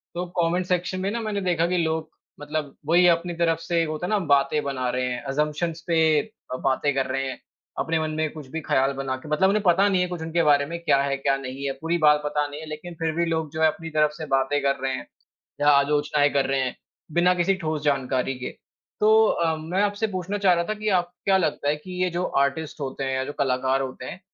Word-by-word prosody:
तो 175 +1 -2
comment 175 +1 +1
section 180 +1 -1
में 195 +2 -1
ना, 235 +2 -2
मैंने 215 -2 -2
देखा 170 -3 +1
कि 180 +1 0
लोग 160 -1 -1 0.3
मतलब 150 -1 -4
वो 160 - 0
ही 180 +1 +6
अपनी 170 0 +2
तरफ 165 -1 +1
से, 165 0 0
होता 155 +1 -3
है - - -4
ना, 215 - +2
बातें 150 -3 +2
बना 130 -3 -2
रहे 125 +1 -1
हैं, 120 - -5
अज़म्प्शन्स 150 +4 -1
पे 160 -2 +4 0.3
अ, - - -2
बातें 135 +2 +1
कर 135 -1 +1
रहे 135 +1 -1
हैं। 130 - -7 0.4
अपने 160 0 0
मन 155 0 -2
में 155 0 0
कुछ 155 -4 -10
भी 160 - -3
ख़याल 135 -2 +2
बना 135 -1 -3
के 140 +4 -12
मतलब 150 +6 +3
उन्हें 210 +2 +2
पता 190 +2 +4
नहीं 185 -2 +2
है 180 - +1
कुछ 175 -2 -5
उनके 165 +1 0
बारे 145 -2 +4
में, 170 +4 -5
क्या 140 -4 +3
है, 140 0 -1
क्या 135 0 +1
नहीं 135 +1 -6
है। 140 - 0
पूरी 165 +2 0
बात 150 0 +5
पता 150 0 0
नहीं 145 +1 -8
है, - - -7
लेकिन 155 +3 -7
फिर 165 -1 0
भी 170 0 +1
लोग, 160 -2 -1
जो 160 - -3
है, 160 - +6
अपनी 165 +1 -3
तरफ 150 0 +4
से 160 - -5
बातें 135 +1 +1
कर 140 0 +2
रहे 135 0 -1
हैं, 130 - -6 0.5
या 145 - +3
आलोचनाएँ 145 +1 +3
कर 140 -1 +2
रहे 135 0 0
हैं, 130 -1 -2 0.4
बिना 175 +3 +4
किसी 180 +2 +2
ठोस 155 -2 -1
जानकारी 135 -2 0
के। 125 - -5 0.5
तो 215 - +5 0.2
अ, 165 -5 +1
मैं 165 +5 -1
आपसे 205 +2 0
पूछना 185 +3 -2
चाह 195 -3 +4
रहा 170 0 0
था 215 - 0
कि 215 0 -4
आपको 175 0 -10
क्या 195 -1 +4
लगता 155 -4 -1
है 150 - +2
कि 180 +4 -5
ये 180 - 0
जो 175 +1 -2 0.2
आर्टिस्ट 150 +3 -4
होते 135 0 -4
हैं 135 0 -1
या 130 - -1
जो 145 - -5
कलाकार 130 0 +1
होते 130 -1 -6
हैं, - - -8
155 Hz, 255 wpm, -24 LUFS, 140-175 Hz, 0.5 s, ही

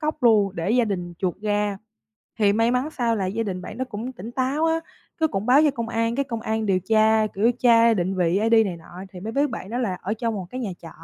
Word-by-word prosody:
cóc 305 -1 -3
luôn 210 -5 +4
để 170 +4 -1
gia 240 +1 +3
đình 180 -5 -4
chuộc 185 0 -2
ra. 205 -1 0 0.6
Thì 205 -2 +4
may 225 +2 +2
mắn 250 +4 0
sao 235 -5 0
là 195 -3 -1
gia 210 +5 -2
đình 185 -4 -4
bạn 210 - -8
đó 260 - -2
cũng 225 +5 -5
tỉnh 230 -2 -9
táo 265 +5 0
á, 325 0 +1 0.4
cái 320 - +3
cũng 195 -3 -3
báo 260 +4 +6
cho 300 - +4
công 235 -4 -4
an, 230 0 0
cái 280 - +1
công 230 -3 -5
an 220 0 -2
điều 190 -2 +2
tra, 220 +2 +3
kiểu, 215 +3 +1
tra 230 -1 +5
định 190 -1 -1
vị 180 +1 +2
ID 225 +2 +1
này 180 -4 -4
nọ, 175 +3 -11
thì 180 - -8
mới 215 +5 -5
biết 285 +3 +1
bạn 215 -5 -7
đó 235 - -3
là 210 -8 -1
ở 195 +3 -2
trong 230 0 -2
một 190 -3 -5
cái 255 - -5
nhà 215 -5 -3
trọ, 165 - -9
220 Hz, 270 wpm, -23 LUFS, 195-240 Hz, 0.6 s, báo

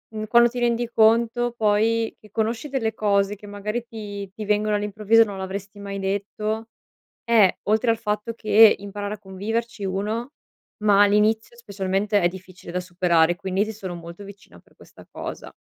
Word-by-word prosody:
mhmm, 215 - -3
quando 235 +2 +5
ti 250 - -9
rendi 240 0 0
conto 235 +2 +3
poi 225 +1 +1
che 215 -2 -19
conosci 225 +6 -2
delle 225 -5 -1
cose 200 -1 +1
che 205 - -15
magari 210 +3 -4
ti 205 -3 -7
ti 215 0 -6
vengono 210 +1 +1
all'improvviso 210 +2 +3
e - - +6
non 200 -2 -7
l'avresti 195 +2 -6
mai 200 -1 -6
detto, 210 +3 -3 0.6
eh 220 -5 +4
oltre 220 +3 +2
al 225 - +1
fatto 210 +1 -2
che 220 -1 +6
imparare 205 +1 -6
a - - -10
conviverci 210 +3 -4
1, 210 +7 -2 0.5
ma 205 -1 +6
all'inizio 215 +3 +2
specialmente 200 -2 -1
è 175 - +4
difficile 185 -1 -11
da 180 - -1
superare, 175 -2 +2
quindi 190 +1 -1
ti 220 - -6
sono 190 -4 -7
molto 170 +3 -10
vicina 200 0 -14
per - - -25
questa - - -17
cosa. - - -8
210 Hz, 170 wpm, -23 LUFS, 195-225 Hz, 0.6 s, e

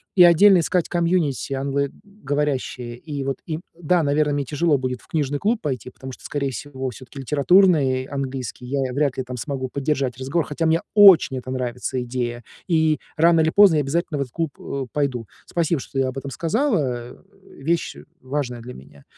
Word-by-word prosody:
И 180 - +8
отдельно 180 +3 +7
искать 175 +1 0
комьюнити 170 -6 0
англоговорящее. 140 - -3
И 145 +1 -5
вот 135 -1 -2
им 160 +1 -3 0.2
да, 170 +1 +2
наверное, 145 +1 +1
мне 145 - 0
тяжело 150 +2 +1
будет 125 -2 -3
в - - -22
книжный 145 -2 -1
клуб 220 +6 +1
пойти, 130 -5 -3
потому 130 +1 -10
что, - - -14
скорее 140 -2 -2
всего, 130 0 -5
всё-таки 130 +4 -11
литературный 145 -2 +3
английский 135 -3 -5
я 135 -1 -1
вряд 140 -1 0
ли 130 - -1
там 125 0 -7
смогу 130 0 -4
поддержать 135 -3 -1
разговор, 135 +6 -1
хотя 160 +3 -2
мне 160 +1 +2
очень 195 -10 +7
эта 130 0 -7
нравится 125 0 -3
идея, 120 -1 -4 0.2
и, 160 -3 +2 0.2
рано 165 +1 +5
или 160 - +3
поздно, 195 -3 +6
я - - +3
обязательно 150 +1 -2
в - - 0
этот 130 -3 -4
клуб, 165 -2 -1
э, 135 -1 -4
пойду. 135 -6 -1 0.2
Спасибо, 170 -2 0
что - - -11
ты - - +3
об 130 0 -3
этом 140 +1 -5
сказала, 155 - -1
э. - - -17 0.5
Вещь, 165 +3 0
э, 70 - -12 0.2
важная 130 -3 -3
для 125 +2 -9
меня. 70 +1 -15
140 Hz, 190 wpm, -22 LUFS, 130-160 Hz, 0.5 s, И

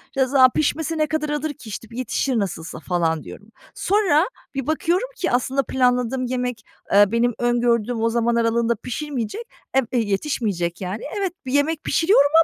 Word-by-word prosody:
"Ya, 265 -1 +3
za 260 -1 +6
pişmesi 320 +3 -1
ne 310 -1 +2
kadar 310 -1 -1
alır 295 0 -2
ki, 230 -4 -12
işte, 215 +2 -6
yetişir 250 0 -1
nasılsa." 165 -5 -4
falan 165 -2 0
diyorum. 200 - -11 0.3
Sonra 380 -5 +2 0.3
bir 270 -1 -3
bakıyorum 345 +8 +1
ki, 360 - -1
aslında 260 +2 +1
planladığım 250 0 +1
yemek, 250 -2 -2 0.3
eee, 205 +1 +8
benim 235 +1 +2
öngördüğüm 240 -1 +1
o 230 - +2
zaman 235 0 +1
aralığında 235 0 +2
pişirmeyecek, 250 - -4 0.4
e 255 -4 +1
b 255 - 0
yetişmeyecek, 200 - -1
yani. 190 +4 -4 0.2
Evet, 385 -3 -1
bir 255 - -4
yemek 295 +2 +1
pişiriyorum 325 -5 +4
250 Hz, 165 wpm, -22 LUFS, 225-290 Hz, 0.4 s, eee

